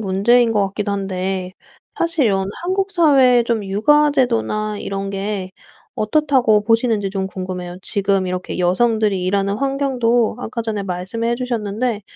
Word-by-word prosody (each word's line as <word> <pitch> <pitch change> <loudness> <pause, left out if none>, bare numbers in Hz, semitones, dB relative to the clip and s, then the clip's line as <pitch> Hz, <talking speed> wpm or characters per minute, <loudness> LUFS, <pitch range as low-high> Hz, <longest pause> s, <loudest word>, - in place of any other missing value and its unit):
문제인 225 +4 +3
것 205 -2 +2
같기도 205 +1 -3
한데 190 -1 -3 0.5
사실 335 -5 +1
이런 195 -2 +1 0.2
한국 385 +2 -1
사회의 270 -8 +5
좀 230 -3 -1
육아 295 +10 +3
제도나 215 -5 0
이런 195 0 -4
게 195 -1 -4 0.5
어떻다고 240 -3 +2
보시는지 225 -3 +1
좀 190 -1 -2
궁금해요. 185 -1 -6
지금 195 -1 0
이렇게 180 0 -4
여성들이 205 +1 +1
일하는 200 +1 0
환경도 255 -4 0
아까 230 +1 -4
전에 215 -3 -3
말씀해 195 +6 -2
주셨는데 235 -2 -2
215 Hz, 325 characters per minute, -19 LUFS, 195-245 Hz, 0.5 s, 사회의